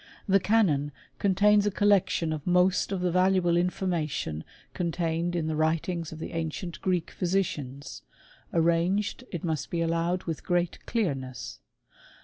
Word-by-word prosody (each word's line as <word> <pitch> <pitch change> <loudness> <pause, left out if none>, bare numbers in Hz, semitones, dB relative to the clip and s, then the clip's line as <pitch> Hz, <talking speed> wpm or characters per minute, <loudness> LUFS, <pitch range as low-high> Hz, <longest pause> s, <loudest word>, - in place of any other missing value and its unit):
The 195 0 +5
Canon 175 -9 +2 0.3
contains 205 +1 +4
a - - +4
collection 190 -5 +2
of 150 0 -6
most 180 +2 +3
of 190 -2 -1
the 180 -1 +1
valuable 185 -1 +3
information 170 - -1 0.3
contained 170 0 -1
in 165 -2 0
the 160 0 -1
writings 165 +2 0
of 160 - -8
the 160 - -6
ancient 165 +2 -4
Greek 180 -3 0
physicians, 150 -7 -2 0.5
arranged, 170 +7 +1
it 175 - -5
must 160 -4 -2
be 170 - -2
allow 165 +1 +1
ed, 185 - -7
with 165 -3 -4
great 175 -1 -1
clearness. 130 - -3
175 Hz, 140 wpm, -28 LUFS, 160-185 Hz, 0.5 s, The